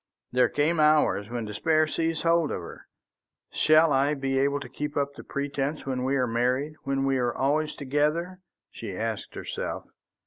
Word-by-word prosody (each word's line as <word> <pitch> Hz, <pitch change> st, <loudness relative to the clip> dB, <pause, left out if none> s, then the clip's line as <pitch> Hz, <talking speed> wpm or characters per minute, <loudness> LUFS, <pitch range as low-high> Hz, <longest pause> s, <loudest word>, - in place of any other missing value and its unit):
There 125 Hz, -1 st, +3 dB
came 155 Hz, +3 st, +1 dB
hours 150 Hz, -9 st, +3 dB
when 120 Hz, -1 st, -3 dB
despair 155 Hz, +10 st, +2 dB
seized 160 Hz, 0 st, -2 dB
hold 165 Hz, -2 st, +3 dB
of -, -, -3 dB
her. 85 Hz, -, -11 dB, 0.6 s
"Shall 155 Hz, 0 st, +4 dB
I 140 Hz, +3 st, +2 dB
be 135 Hz, -1 st, -1 dB
able 140 Hz, +1 st, +1 dB
to 135 Hz, -, -7 dB
keep 145 Hz, +3 st, -5 dB
up 140 Hz, 0 st, 0 dB
the -, -, -11 dB
pretence 140 Hz, +1 st, -3 dB
when 130 Hz, -2 st, -2 dB
we 135 Hz, +2 st, +1 dB
are 130 Hz, -2 st, +2 dB
married, 125 Hz, +5 st, 0 dB
when 135 Hz, 0 st, 0 dB
we 135 Hz, -1 st, +1 dB
are 120 Hz, -1 st, 0 dB
always 150 Hz, +3 st, 0 dB
together?" 150 Hz, +6 st, -1 dB, 0.3 s
she -, -, -7 dB
asked -, -, -4 dB
herself. -, -, -5 dB
140 Hz, 175 wpm, -27 LUFS, 130-155 Hz, 0.6 s, Shall